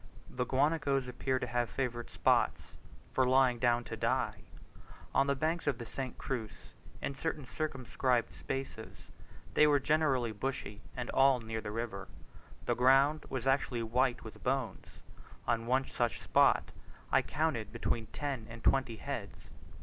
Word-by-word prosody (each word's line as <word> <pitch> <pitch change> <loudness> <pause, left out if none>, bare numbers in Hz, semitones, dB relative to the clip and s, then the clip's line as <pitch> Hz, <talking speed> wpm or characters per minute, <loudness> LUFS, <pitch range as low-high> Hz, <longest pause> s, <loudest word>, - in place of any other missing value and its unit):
The 125 0 -2
guanacos 140 -1 +2
appear 130 +1 -1
to 125 - -2
have 120 -1 0
favourite 120 -3 -3
spots - - +1 0.4
for 130 - +3
lying 130 -1 +4
down 120 0 +3
to - - -6
die. - - -1 0.7
On 135 - +4
the 140 - +2
banks 160 +4 -1
of 140 -4 +2
the 120 - -6
St. 130 +2 -5
Cruz, 115 -6 -5 0.3
in - - -1
certain 150 0 -3
circumscribed 130 -3 -1
spaces, 135 -4 -6 0.4
which 150 - +6
were 145 -1 +4
generally 135 -5 +2
bushy 110 -2 -4 0.2
and 125 -1 -3
all 135 -1 +5
near 110 -1 -4
the 105 - -5
river, 105 -3 -4 0.6
the - - +2
ground 135 +4 +4
was 130 -2 -3
actually 135 -3 +1
white 125 +2 +1
with 110 - -10
bones. 130 -5 -1 0.6
On 115 0 0
one 130 +2 +2
such 120 -2 -1
spot - - +4 0.4
I - - +5
counted 145 -9 -1
between 115 -2 -1
ten 135 -5 -4
and 115 0 -9
twenty 130 -4 +2
heads. 110 - -6
130 Hz, 150 wpm, -33 LUFS, 120-135 Hz, 0.7 s, which